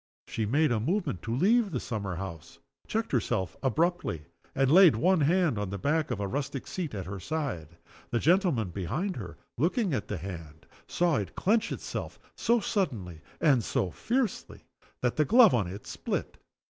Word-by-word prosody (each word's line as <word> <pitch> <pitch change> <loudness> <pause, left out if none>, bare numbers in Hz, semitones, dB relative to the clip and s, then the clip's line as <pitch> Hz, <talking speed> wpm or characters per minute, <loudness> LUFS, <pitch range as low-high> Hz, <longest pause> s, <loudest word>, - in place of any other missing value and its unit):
She 110 -2 -2
made 150 +5 +2
a 115 - +1
movement 160 - -1
to 115 +4 -3
leave 210 - +3
the - - -2
summer 100 -6 -4
house 85 -4 -7 0.3
checked 225 +1 -2
herself 95 -7 0
abruptly 135 - 0 0.3
and 135 0 +2
laid 180 - +8
one 175 +8 +3
hand 160 - +2
on 105 -2 -2
the 100 - -4
back 150 - 0
of 120 -5 -2
a 100 - -1
rustic 135 +3 -3
seat 165 - -4
at 95 -3 -4
her 95 +2 -6
side. 90 - -4 0.3
A 120 - +1
gentleman 160 - +2
behind 120 - -2
her, 90 -8 -7 0.2
looking 180 - +1
at 115 - -2
the - - -3
hand, 80 -3 -8 0.2
saw 170 -4 +1
it 95 -4 -4
clench 220 +3 +1
itself - - -5 0.2
so 235 +1 +2
suddenly 115 - -2 0.2
and 135 -7 +4
so 90 - -1
fiercely 240 - -2 0.4
that 125 - 0
the 155 - +5
glove 230 - +6
on 110 -7 +1
it 100 +4 -8
split. - - -4
135 Hz, 175 wpm, -29 LUFS, -, 0.4 s, laid